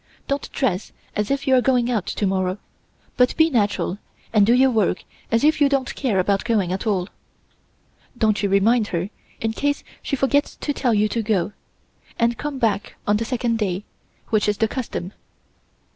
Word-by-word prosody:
Don't 280 0 -2
dress 215 -8 -1 0.2
as 210 -1 -1
if 275 0 -1
you 265 - +3
are 255 - +5
going 250 -1 +2
out 215 -6 -1
to 205 - -1
morrow, 185 0 0 0.6
but 250 0 +3
be 320 0 +4
natural 205 -5 0 0.3
and 210 -2 +5
do 235 - +5
your 260 +1 +5
work 215 -5 +1 0.3
as 230 +2 +2
if 310 0 +3
you 285 - +6
don't 275 -2 0
care 245 -8 0
about 195 +1 +1
going 210 -7 +1
at 190 +4 -3
all. 190 -4 +1 1.1
Don't 215 -4 +2
you 200 - +1
remind 210 +3 +3
her, 180 +3 -3 0.3
in 225 0 0
case 285 +4 -1 0.2
she 275 - -2
forgets 280 +2 +1
to 290 - -3
tell 245 -5 +1
you 210 +1 +3
to 230 - -1
go, 205 -3 0 0.6
and 235 0 +1
come 295 -2 -3
back 215 -4 0
on 205 0 +3
the 230 - -2
second 235 -2 -1
day, 195 -2 -1 0.5
which 215 -1 +2
is 205 - 0
the 220 - +2
custom. 215 -6 -5
225 Hz, 190 wpm, -22 LUFS, 200-255 Hz, 1.1 s, you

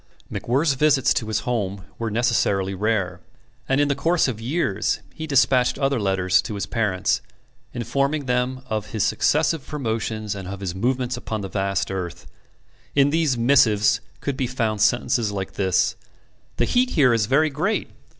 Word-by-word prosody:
MacWhirr's 140 +5 +1
visits 135 -1 +3
to 110 - -2
his 110 0 -1
home 100 -6 -2
were 115 -1 -2
necessarily 105 -4 +1
rare, 95 -3 -1 0.5
and 135 +1 +2
in 145 - +3
the 140 - +2
course 165 +4 +2
of 115 -4 -4
years 125 - 0
he 160 - -6
despatched 130 -3 +3
other 135 -2 +1
letters 95 -2 +2
to 105 - -6
his 100 - -2
parents, 105 -6 0 0.5
informing 140 +5 -1
them 125 +1 -1
of 110 -3 -4
his 110 - 0
successive 155 0 +1
promotions 110 -6 -3
and 95 -2 -7
of 100 0 -6
his 95 -3 -3
movements 125 +5 -1
upon 110 -3 -4
the 95 - -5
vast 100 0 -1
earth. 90 -2 -5 0.7
In 140 0 +4
these 155 -5 +1
missives 115 -4 +4 0.2
could 140 - -2
be 130 -3 0
found 115 -4 -1
sentences 110 -1 +2
like 95 -2 -4
this: 95 -2 +1 0.6
"The - - +2
heat 250 +1 +2
here 130 -5 +5
is 110 -3 +1
very 150 +5 +3
great." 180 +10 -1
115 Hz, 165 wpm, -23 LUFS, 100-135 Hz, 0.7 s, here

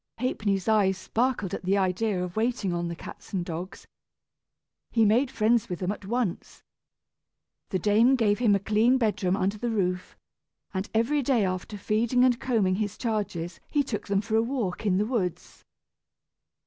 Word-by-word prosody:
Ha'penny's 205 -6 -1
eyes 200 -4 +3
sparkled 225 -1 -1
at - - -4
the 190 +2 +2
idea 190 0 0
of 180 -1 -6
waiting 220 -4 0
on 170 0 -2
the 170 - -4
cats - - -11
and 180 -3 -1
dogs. 175 +2 -6 1.0
He 225 -2 +3
made 240 +6 +3
friends 230 -2 +1
with 180 - -3
them 185 +2 -2
at 205 - -7
once. 235 -5 -3 1.1
The 190 - 0
dame 220 +7 +4
gave 215 -4 +2
him 220 -5 +4
a - - +1
clean 220 +5 +3
bedroom 205 -5 +1
under 200 +2 -1
the 240 - -1
roof, 185 -4 -2 0.6
and 190 +1 -3
every 265 +7 +2
day 245 -6 +2
after 185 +3 -4
feeding 225 +5 +1
and 250 -1 +3
combing 205 -7 +1
his 205 -2 -2
charges 200 -7 -3
he 290 -2 +2
took 230 -6 -5
them 200 -1 +1
for 220 +1 -2
a 225 - +5
walk 225 -5 -2
in 185 -2 +3
the 205 - +1
woods. 210 -8 -3
210 Hz, 175 wpm, -27 LUFS, 185-235 Hz, 1.1 s, a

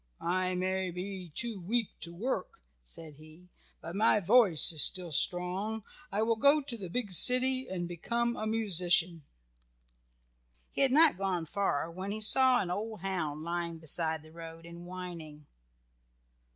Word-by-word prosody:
"I 185 +1 -2
may 185 +1 -2
be 180 0 -7
too 230 -4 -4
weak 220 +5 -2
to 170 - -6
work," 265 - -5 0.2
said 160 -3 -10
he, 155 +4 -18 0.3
"but 165 - -9
my 215 +1 +2
voice 200 -5 +5
is 155 -3 +4
still 180 0 +6
strong. 185 +7 0 0.3
I 210 +2 -1
will 225 0 0
go 280 +5 +4
to 270 -4 -5
the 195 -6 -9
big 210 +1 -3
city 255 +6 +3
and 175 -2 -5
become 235 +8 -3
a 215 - -5
musician." 180 -6 +2 1.5
He - - -4
had 270 -2 +3
not 305 - +4
gone 185 -4 -2
far 165 -3 -3
when 185 +3 -7
he 210 +2 -5
saw 255 +4 +4
an 180 -3 -5
old 215 +1 -6
hound 160 -6 -4
lying 170 0 -4
beside 160 0 -1
the 155 - -17
road 165 0 -12
and 170 +1 -12
whining. 170 -5 -10
185 Hz, 155 wpm, -29 LUFS, 170-220 Hz, 1.5 s, still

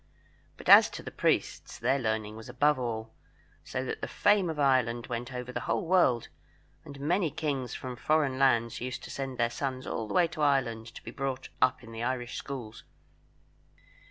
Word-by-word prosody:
But - - -11
as - - +9
to - - -9
the - - -7
priests, - - 0
their 135 +1 +1
learning 110 -3 -2
was 110 0 -10
above 150 -1 +2
all, 115 -2 -4 0.5
so 130 +1 -4
that - - -4
the - - -2
fame 205 -3 +3
of 160 - -4
Ireland 125 -4 +2
went 120 +2 -4
over 125 0 -5
the - - -3
whole 200 - +1
world, 165 -10 +3 0.6
and 140 -3 -10
many 170 +4 +1
kings 140 -4 -3
from 130 -1 -6
foreign 145 0 +1
lands 115 -4 +2
used 125 0 -4
to - - -8
send 135 -2 -4
their 120 0 +1
sons 130 0 -3
all 110 - -3
the - - -5
way 180 -2 +5
to 165 -2 -6
Ireland 125 -6 +1
to - - -10
be 115 - -7
brought 135 0 -4
up 130 0 +3
in 115 - -11
the 115 0 -6
Irish 120 0 -2
schools. 120 -5 -7
130 Hz, 190 wpm, -29 LUFS, 120-140 Hz, 0.6 s, as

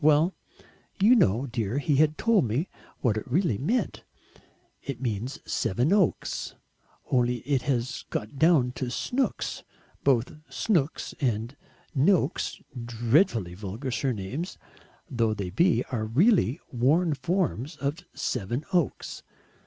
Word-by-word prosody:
Well, 155 +4 +5 0.7
you 210 +6 +6
know, 125 - +3
dear, 115 -2 -2
he 145 0 +1
had 155 +1 +3
told 225 - +3
me 125 - -1 0.3
what 115 -5 +2
it 110 - -5
really 150 - +2
meant; 220 - -1 0.8
it 135 -4 -5
means 120 +1 -3
Sevenoaks, 155 - +1 0.6
only 125 -1 +3
it 135 0 0
has 125 -1 -1
got 110 +6 -4
down 155 -7 +4
to 130 - -2
Snooks 250 - -1 0.4
both 130 -3 +3 0.2
Snooks 165 -9 0
and 120 0 -1 0.4
Noaks, 155 +2 +2 0.2
dreadfully 115 - +2
vulgar 105 +8 -5
surnames 120 - -3 0.5
though 115 -3 0
they 100 -3 -4
be, 170 - +3
are 110 -4 -1
really 155 - +3
worn 150 +7 +3
forms 155 - -1
of 140 +4 -2 0.2
Sevenoaks. 145 - -2
135 Hz, 115 wpm, -27 LUFS, 115-165 Hz, 0.8 s, you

